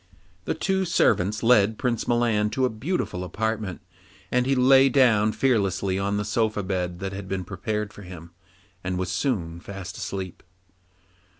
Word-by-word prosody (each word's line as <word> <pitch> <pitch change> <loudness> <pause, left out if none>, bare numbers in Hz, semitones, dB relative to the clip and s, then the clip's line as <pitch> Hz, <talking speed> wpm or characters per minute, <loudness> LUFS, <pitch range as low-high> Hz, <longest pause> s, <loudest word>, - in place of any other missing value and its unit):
Then - - -1
two 190 0 0
servants 105 - +2
led 110 -2 +4
Prince 120 -3 -1
Milan 115 -3 +2
to 130 - +3
a 125 - 0
beautiful 110 - -3
apartment, 105 +1 -3 0.5
and 125 0 +2
he 135 - +3
lay 135 +1 +6
down 115 -5 +4
fearlessly 100 -7 +1
on 100 +1 0
the 105 - -2
soft 105 -2 0
bed 90 -2 -2
that 95 0 -3
had 95 0 -6
been 95 -1 -2
prepared 105 +3 -3
for - - -11
him, 90 -3 -10 0.5
and 90 0 -2
was 90 -1 -2
soon 90 - -1
fast 95 +1 -8
asleep. 95 -3 -5
105 Hz, 160 wpm, -25 LUFS, 95-120 Hz, 0.5 s, lay